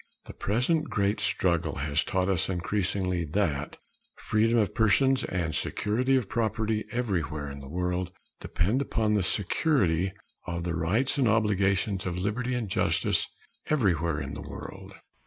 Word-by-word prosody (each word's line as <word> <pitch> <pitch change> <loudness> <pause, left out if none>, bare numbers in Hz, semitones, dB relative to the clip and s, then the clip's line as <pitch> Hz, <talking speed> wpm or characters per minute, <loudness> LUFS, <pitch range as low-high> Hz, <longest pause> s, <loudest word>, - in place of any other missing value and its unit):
The - - -9
present 130 - +1
great 100 0 +1
struggle 85 -4 +1
has 75 +2 0
taught 95 -1 0
us 95 -2 0
increasingly 90 -1 -1
that 75 -3 -1 0.4
freedom 115 +2 +1
of 105 -3 +2
person 120 +5 +4
and 85 -3 -1
security 120 - 0
of 125 -6 +1
property 110 -1 -1
anywhere 85 - -2
in 70 - -8
the 70 -1 -10
world 90 +2 -2 0.3
depend 105 +10 0
upon 110 -5 0
the 105 - +3
security 95 - +1 0.4
of 85 -1 -3
the 85 -1 -2
rights 105 - +1
and 130 - +4
obligations 100 -3 +1
of 90 -1 -2
liberty 115 +7 -1
and 120 -3 -2
justice 90 - +1 0.4
everywhere 85 - +1
in 70 0 -5
the 75 - -6
world. 75 - -9
95 Hz, 145 wpm, -28 LUFS, 85-110 Hz, 0.4 s, person